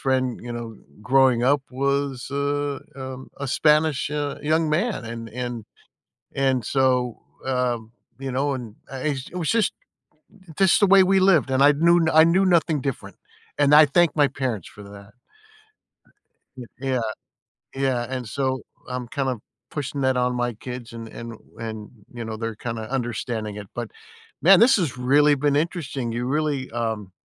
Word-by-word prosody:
friend, 130 Hz, -2 st, 0 dB
you 120 Hz, 0 st, -6 dB
know, 115 Hz, -1 st, -6 dB, 0.3 s
growing 130 Hz, 0 st, +4 dB
up 140 Hz, +1 st, +3 dB
was 140 Hz, 0 st, -1 dB
a 145 Hz, 0 st, -1 dB, 0.2 s
um, 130 Hz, 0 st, -8 dB
a 140 Hz, -, -3 dB
Spanish, 150 Hz, 0 st, +2 dB
uh, 145 Hz, -1 st, -2 dB
young 160 Hz, +2 st, +1 dB
man, 190 Hz, -, 0 dB
an 115 Hz, 0 st, -6 dB
and 120 Hz, 0 st, -5 dB, 0.7 s
and 135 Hz, -3 st, +1 dB
so, 135 Hz, +2 st, +2 dB, 0.6 s
um, 120 Hz, -3 st, -1 dB, 0.3 s
you 135 Hz, -1 st, -4 dB
know, 140 Hz, +3 st, 0 dB
and, 115 Hz, -5 st, -8 dB, 0.2 s
ah 135 Hz, -, -5 dB
eh, 145 Hz, -, 0 dB, 0.2 s
it -, -, -4 dB
was 165 Hz, -4 st, -2 dB
just 225 Hz, -3 st, +2 dB, 0.9 s
just 190 Hz, -2 st, +5 dB
the 205 Hz, -, +7 dB
way 195 Hz, -, +8 dB
we 190 Hz, +1 st, +3 dB
lived 180 Hz, -8 st, +4 dB
and 130 Hz, +1 st, +3 dB
I 145 Hz, -, +8 dB
knew 170 Hz, +4 st, +4 dB, 0.2 s
I -, -, +8 dB
knew 190 Hz, +1 st, +3 dB
nothing 170 Hz, -4 st, +3 dB
different, 135 Hz, -2 st, -5 dB, 0.4 s
and 145 Hz, 0 st, +4 dB
I 155 Hz, 0 st, +9 dB
thank 175 Hz, +4 st, +4 dB
my 145 Hz, -2 st, +4 dB
parents 115 Hz, -9 st, -2 dB
for 105 Hz, -, -11 dB
that. 100 Hz, +1 st, -13 dB, 1.5 s
Y 125 Hz, -, -7 dB, 0.2 s
yeah, 130 Hz, -2 st, 0 dB, 0.7 s
yeah, 130 Hz, -3 st, 0 dB
and 130 Hz, -2 st, -4 dB
so 130 Hz, +1 st, -1 dB, 0.3 s
I'm 125 Hz, -1 st, -4 dB
kinda 130 Hz, -2 st, -2 dB, 0.3 s
pushing 145 Hz, -1 st, -4 dB
that 130 Hz, -1 st, +2 dB
on 125 Hz, 0 st, +1 dB
my 120 Hz, -1 st, -1 dB
kids 125 Hz, +1 st, -8 dB
and 115 Hz, -1 st, -7 dB
and 115 Hz, 0 st, -8 dB, 0.2 s
and, 110 Hz, -2 st, -6 dB, 0.2 s
you 120 Hz, -1 st, -6 dB
know, 110 Hz, -1 st, -5 dB
they're 115 Hz, 0 st, -4 dB
kinda 115 Hz, -1 st, -5 dB
understanding 120 Hz, -4 st, -3 dB
it, 105 Hz, -1 st, -7 dB
but -, -, -5 dB, 0.5 s
man, 195 Hz, +1 st, +7 dB
this 245 Hz, +3 st, +6 dB
has 160 Hz, -, -1 dB
really 145 Hz, +4 st, +4 dB
been 145 Hz, +1 st, +1 dB
interesting, 145 Hz, -7 st, -2 dB
you 120 Hz, +1 st, -2 dB
really, 145 Hz, -1 st, -1 dB
um, 110 Hz, -5 st, -3 dB
130 Hz, 165 wpm, -23 LUFS, 120-145 Hz, 1.5 s, I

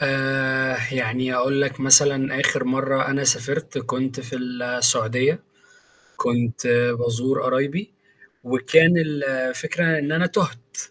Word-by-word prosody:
آآ 135 Hz, -1 st, 0 dB, 0.2 s
يعني 125 Hz, 0 st, -2 dB
أقول 135 Hz, +3 st, 0 dB
لك 135 Hz, -1 st, -3 dB
مثلًا 135 Hz, 0 st, +5 dB
آخر -, -, +1 dB
مَرّة 135 Hz, +1 st, -1 dB
أنا 140 Hz, 0 st, -1 dB
سافرت 135 Hz, +4 st, 0 dB
كنت 130 Hz, +1 st, -4 dB
في 125 Hz, 0 st, -8 dB
السعودية، 125 Hz, +3 st, 0 dB, 0.7 s
كنت 120 Hz, +1 st, -2 dB, 0.3 s
بازور 120 Hz, +3 st, -1 dB
قرايبي 140 Hz, +11 st, -2 dB, 0.5 s
وكان 130 Hz, +7 st, +4 dB
الفكرة 150 Hz, +2 st, -1 dB
إن 150 Hz, 0 st, -3 dB
أنا 165 Hz, +3 st, +1 dB
تُهت، 165 Hz, -, -3 dB
130 Hz, 110 wpm, -21 LUFS, 125-140 Hz, 0.7 s, مثلًا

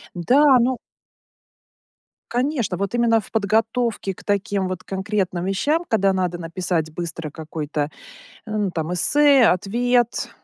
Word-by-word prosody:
Да, 260 Hz, -, +4 dB
ну 250 Hz, +1 st, +1 dB, 1.5 s
Конечно, 245 Hz, -, -1 dB
вот 200 Hz, +3 st, -3 dB
именно 235 Hz, -1 st, +3 dB
в -, -, -15 dB
подготовке 225 Hz, -1 st, 0 dB
к -, -, -15 dB
таким 200 Hz, -1 st, -1 dB
вот, 185 Hz, 0 st, -6 dB
конкретным 190 Hz, -2 st, -2 dB
вещам, 295 Hz, -, 0 dB
когда 195 Hz, -3 st, +2 dB
надо 180 Hz, -2 st, -1 dB
написать 165 Hz, -2 st, -2 dB
быстро 165 Hz, -2 st, -4 dB
какой-то, 155 Hz, -2 st, -4 dB, 0.6 s
м, 210 Hz, -2 st, -1 dB
там 165 Hz, 0 st, -3 dB
эссе, 280 Hz, -, +5 dB
ответ, 240 Hz, +6 st, +1 dB
200 Hz, 120 wpm, -22 LUFS, 175-240 Hz, 1.5 s, эссе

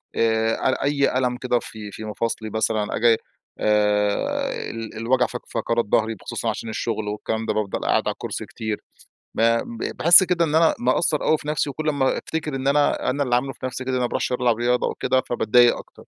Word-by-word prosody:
آآ، 115 Hz, 0 st, +2 dB
أ 130 Hz, 0 st, -1 dB
أي 140 Hz, -2 st, +1 dB
ألم 125 Hz, -1 st, 0 dB
كده 125 Hz, -1 st, 0 dB
في 105 Hz, -3 st, -9 dB
في 110 Hz, -, -8 dB
مفاصلي 110 Hz, 0 st, -3 dB
مثلًا 110 Hz, -1 st, -1 dB
آجي، 115 Hz, 0 st, +4 dB, 0.4 s
آآ، 105 Hz, -1 st, 0 dB
ال 115 Hz, -1 st, -7 dB
الوجع 125 Hz, +3 st, +2 dB
فق 125 Hz, -, -6 dB
فقرات 115 Hz, -1 st, -1 dB
ضهري 110 Hz, +2 st, +1 dB
بخصوصًا 95 Hz, -, -4 dB
عشان 115 Hz, -, -4 dB
الشغل 110 Hz, -1 st, -3 dB
والكلام 110 Hz, +2 st, -3 dB
ده، -, -, 0 dB
بافضل 105 Hz, -2 st, -2 dB
قاعد -, -, +1 dB
على -, -, 0 dB
الكرسي -, -, -5 dB
كتير، 110 Hz, -1 st, -5 dB, 0.5 s
ب -, -, -1 dB
ب 115 Hz, 0 st, 0 dB
باحس 175 Hz, +3 st, +8 dB
كده 175 Hz, -2 st, +1 dB
إن 155 Hz, -1 st, -1 dB
أنا 160 Hz, 0 st, +4 dB
مقصّر 145 Hz, +5 st, +1 dB
أوي 155 Hz, -, +3 dB
في 150 Hz, -, -11 dB
نَفسي، 150 Hz, -1 st, 0 dB
وكُلّ 155 Hz, +3 st, -2 dB
أما 140 Hz, -3 st, +1 dB
أفتكر 155 Hz, -3 st, -4 dB
إن 135 Hz, 0 st, -3 dB
أنا 145 Hz, +1 st, +2 dB
أنا 140 Hz, +2 st, 0 dB
اللي 125 Hz, -2 st, +1 dB
عامله 135 Hz, +2 st, -1 dB
في -, -, -8 dB
نَفسي 130 Hz, +1 st, -5 dB
كده، 130 Hz, 0 st, -3 dB
أنا 130 Hz, -, 0 dB
ما 125 Hz, -, +1 dB
باروحش -, -, -2 dB
ألعب 125 Hz, -2 st, +1 dB
رياضة 120 Hz, +1 st, +1 dB
وكده، 130 Hz, 0 st, 0 dB
فباتضايق 120 Hz, +1 st, +4 dB
أكتر. -, -, -13 dB
120 Hz, 205 wpm, -23 LUFS, 110-135 Hz, 0.5 s, باحس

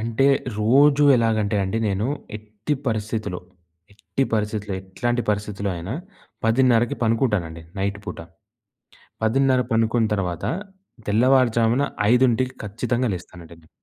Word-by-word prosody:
అంటే 115 Hz, +4 st, +1 dB, 0.3 s
రోజూ 140 Hz, +6 st, +5 dB
ఎలాగంటే 110 Hz, -3 st, +1 dB
అండి, 95 Hz, +4 st, -2 dB
నేను 100 Hz, +3 st, -1 dB, 0.3 s
ఎట్టి 110 Hz, +6 st, -4 dB
పరిస్థితిలో, 110 Hz, -4 st, -2 dB, 0.5 s
ఎట్టి 135 Hz, +6 st, -2 dB
పరిస్థితిలో, 105 Hz, -1 st, -2 dB
ఎట్లాంటి 120 Hz, +6 st, -2 dB
పరిస్థితిలో 100 Hz, -1 st, -2 dB
అయినా 90 Hz, +7 st, -5 dB, 0.5 s
10:30కి 120 Hz, 0 st, +3 dB
పనుకుంటానండి 105 Hz, -9 st, 0 dB, 0.2 s
నైట్ 100 Hz, +1 st, -2 dB
పూట. -, -, -6 dB, 1.1 s
10:30 130 Hz, +3 st, +3 dB
పనుకున్న 115 Hz, 0 st, +2 dB
తర్వాత 90 Hz, -4 st, -3 dB, 0.6 s
తెల్లవారుజామున 120 Hz, +1 st, +3 dB, 0.3 s
5కి 130 Hz, 0 st, +2 dB
ఖచ్చితంగా 120 Hz, +3 st, -1 dB
లేస్తానండి 85 Hz, -2 st, -11 dB
నేను. 80 Hz, -, -24 dB
110 Hz, 105 wpm, -23 LUFS, 100-120 Hz, 1.1 s, రోజూ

